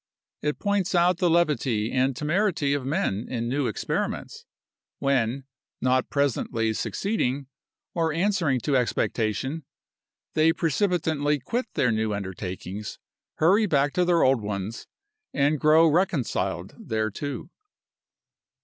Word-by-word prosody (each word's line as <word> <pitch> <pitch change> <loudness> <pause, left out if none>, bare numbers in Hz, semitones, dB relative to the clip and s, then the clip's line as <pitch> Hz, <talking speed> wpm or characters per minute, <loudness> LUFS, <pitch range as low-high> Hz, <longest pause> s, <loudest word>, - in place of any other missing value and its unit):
It 150 0 -1
points 200 -3 0
out 175 0 +3
the 180 - +3
levity 140 -10 +1
and 130 0 +1
temerity 155 - +1
of 140 -2 -2
men 110 -7 -1
in 115 -2 -2
new 135 +1 0
experiments, - - -3 0.5
when, 135 -1 0 0.4
not 130 0 +1
presently 115 -5 0
succeeding, 140 - -1 0.5
or 165 -2 +1
answering 165 - +1
to 145 +2 0
expectation, 125 +3 0 0.7
they 160 +1 +4
precipitantly 160 -4 +1
quit 240 - -2
their 125 - +2
new 110 -1 0
undertakings, 95 +1 -6 0.4
hurry 200 +7 +4
back 145 -3 +2
to 180 - +2
their 175 -1 +3
old 130 -3 +3
ones, 105 +2 -4 0.5
and 145 +1 +2
grow 155 +3 +6
reconciled 160 - 0 0.2
thereto. 110 - -3
140 Hz, 115 wpm, -26 LUFS, 120-165 Hz, 0.7 s, grow